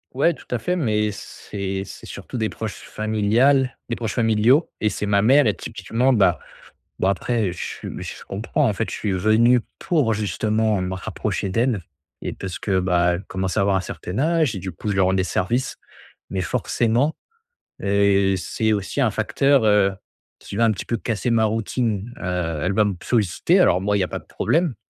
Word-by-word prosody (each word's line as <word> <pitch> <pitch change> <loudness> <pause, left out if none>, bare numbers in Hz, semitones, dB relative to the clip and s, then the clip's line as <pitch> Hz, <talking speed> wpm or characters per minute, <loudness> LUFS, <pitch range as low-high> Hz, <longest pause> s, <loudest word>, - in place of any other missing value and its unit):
Ouais, 165 +5 +3
tout - - -15
à 125 - 0
fait, 180 +11 -1
mais 105 -9 +1
c'est 95 -1 -5
c'est - - -11
surtout 125 - -7
des 110 - 0
proches 110 -1 -6
familiales 115 +6 +1
des 115 - -1
proches 115 -3 -4
familiaux 115 +6 +3
et 105 - +3
c'est 105 - -3
ma 100 -1 +3
mère 135 +6 +5
et 105 -5 +2
typiquement, 125 +4 -1
bah 105 -5 +3 0.6
bah, 95 - +2
après, 100 0 0
je - - -10
suis - - -6
je - - -8
comprends, 115 +8 -1
en - - +1
fait. 110 +2 -3
Je - - -4
suis 105 -3 -2
venu 110 +6 +4 0.2
pour 140 -10 +1
justement 110 0 0
me 90 0 -2
rapprocher 95 +1 -3
d'elle 115 +1 +1 0.4
et - - -3
parce 95 -2 -6
que, 95 -3 0
bah, 90 -1 +2
elle 85 - -4
commence 95 0 -3
à - - +3
avoir 100 0 +2
un 95 - +1
certain 90 +2 -6
âge 160 -3 +2
et - - -3
du 95 0 -5
coup, 85 - -6
je 105 - +1
lui 95 - +1
rends 95 0 +3
des 95 - +2
services. 120 +8 -1 0.5
Mais 95 - -2
forcément, 120 - 0 0.7
heu, 100 -1 +3
c'est 110 +4 -1
aussi 100 -2 -2
un - - +4
facteur, 135 -2 +2
heu, 105 -2 +4 0.5
si - - -13
tu 100 - -5
veux, 115 - +3
un 115 - +4
petit 100 - -5
peu 115 - -1
casser 115 +1 -2
ma 110 -1 +3
routine, 110 +1 -1
heu, 90 -4 -2
elle 95 - 0
va 105 +2 +4
me 100 - 0
solliciter, 105 -8 +2
alors 90 +1 +4
moi, 105 +1 +1
il - - +1
y - - +3
a - - -1
pas - - -5
de - - -20
problème, 165 -6 0
105 Hz, 205 wpm, -22 LUFS, 95-120 Hz, 0.7 s, mère